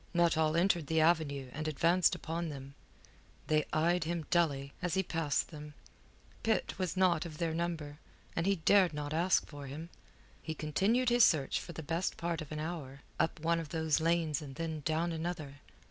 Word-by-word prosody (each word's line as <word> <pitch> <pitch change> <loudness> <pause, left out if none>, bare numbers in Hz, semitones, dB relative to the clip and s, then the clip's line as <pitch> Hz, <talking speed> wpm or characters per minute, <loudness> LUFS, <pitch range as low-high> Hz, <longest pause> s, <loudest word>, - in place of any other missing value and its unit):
Nuttall 160 -2 +3
entered 170 -3 +2
the 160 +1 +2
avenue 155 -5 +2
and 155 +2 -4
advanced 170 +4 +3
upon 165 +1 -3
them. 140 -1 -8 0.7
They 155 -1 +2
eyed 170 +2 +2
him 165 -1 -2
dully, 140 -6 +1
as 180 0 -1
he 190 - +2
passed 160 -5 -1
them. 150 -1 -9 0.7
Pitt 225 -3 0
was 185 0 -2
not 180 -4 +3
of 160 -3 -8
their 165 -1 -1
number, 160 -3 -3 0.4
and 165 +3 0
he 200 - +4
dared 185 -1 +4
not 145 0 -4
ask 170 +3 +2
for 145 -2 -9
him. 155 +5 -7 0.5
He 160 - -5
continued 200 +12 +1
his 240 0 +5
search 150 -9 +3
for 170 - -8
best 165 +3 -2
part 170 -1 -2
of 155 - -8
an 155 - -4
hour, 150 -4 -5 0.2
up 165 -1 0
one 165 +1 +2
of 165 -3 -6
those 160 0 +1
lanes 165 -2 +1
and 135 -3 -8
then 160 0 -3
down 165 +2 0
another. 160 -4 -4
160 Hz, 180 wpm, -33 LUFS, 150-170 Hz, 0.7 s, his